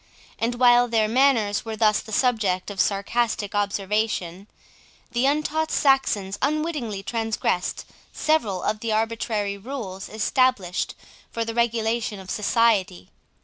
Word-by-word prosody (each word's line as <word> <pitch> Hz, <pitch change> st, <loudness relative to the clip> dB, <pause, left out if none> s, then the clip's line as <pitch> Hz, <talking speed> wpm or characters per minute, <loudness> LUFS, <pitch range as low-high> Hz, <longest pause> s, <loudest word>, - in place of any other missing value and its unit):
And 235 Hz, +2 st, 0 dB
while 245 Hz, 0 st, +5 dB
their 225 Hz, -2 st, +2 dB
manners 230 Hz, -4 st, +2 dB
were 225 Hz, -2 st, -5 dB
thus 215 Hz, -1 st, +3 dB
the 220 Hz, -, -10 dB
subject 210 Hz, -6 st, +1 dB
of 195 Hz, -, 0 dB
sarcastic 205 Hz, +1 st, -1 dB
observation, 200 Hz, -2 st, -1 dB, 0.6 s
the 240 Hz, +3 st, +1 dB
untaught 305 Hz, +2 st, 0 dB
Saxons 210 Hz, -8 st, +1 dB
unwittingly 290 Hz, -9 st, -1 dB
transgressed 225 Hz, -4 st, -2 dB, 0.3 s
several 225 Hz, -, 0 dB
of 215 Hz, 0 st, -1 dB
the 225 Hz, 0 st, -3 dB
arbitrary 215 Hz, -2 st, -1 dB
rules 205 Hz, -5 st, -6 dB
established 215 Hz, -4 st, 0 dB, 0.3 s
for 230 Hz, 0 st, -3 dB
the 225 Hz, -, -4 dB
regulation 225 Hz, -2 st, 0 dB
of 190 Hz, -1 st, -8 dB
society. 210 Hz, -, +1 dB
220 Hz, 120 wpm, -24 LUFS, 200-240 Hz, 0.6 s, while